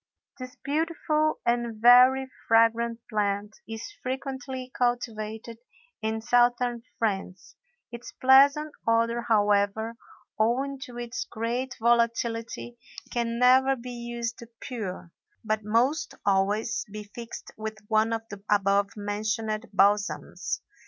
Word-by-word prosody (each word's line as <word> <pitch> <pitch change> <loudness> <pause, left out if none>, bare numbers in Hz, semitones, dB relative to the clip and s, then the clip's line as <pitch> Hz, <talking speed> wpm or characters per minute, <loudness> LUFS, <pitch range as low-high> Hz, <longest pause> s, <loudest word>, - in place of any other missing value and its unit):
This 255 0 -8
beautiful 310 0 0
and 235 -2 0
very 250 +3 +7 0.2
fragrant 230 +1 +3
plant 205 0 -1
is 225 - -7
frequently 260 0 -5
cultivated 225 -2 -2 0.4
in 220 0 -2
Southern 240 0 +2 0.2
France; 195 -5 -3 0.4
its 235 0 -8
pleasant 280 +3 +5 0.2
odor, 230 +1 +2
however, 210 0 +1 0.4
owing 265 +5 +1
to 245 -3 -11
its 240 0 -4
great 240 +3 -3
volatility, 235 0 0 0.3
can 235 -1 -1
never 260 +2 +5
be 250 0 -8
used 235 -1 -5 0.2
pure, 195 -8 -6 0.3
but 215 0 -1
must 240 +9 +1
always 205 +3 +1
be 210 0 -6
fixed 230 +3 -9
with 220 0 -5
one 220 +1 +2
of 225 0 -2
the 200 -1 -9
above 200 0 +3
mentioned 215 +2 -2
balsams. 205 +1 +1
230 Hz, 110 wpm, -27 LUFS, 215-245 Hz, 0.4 s, very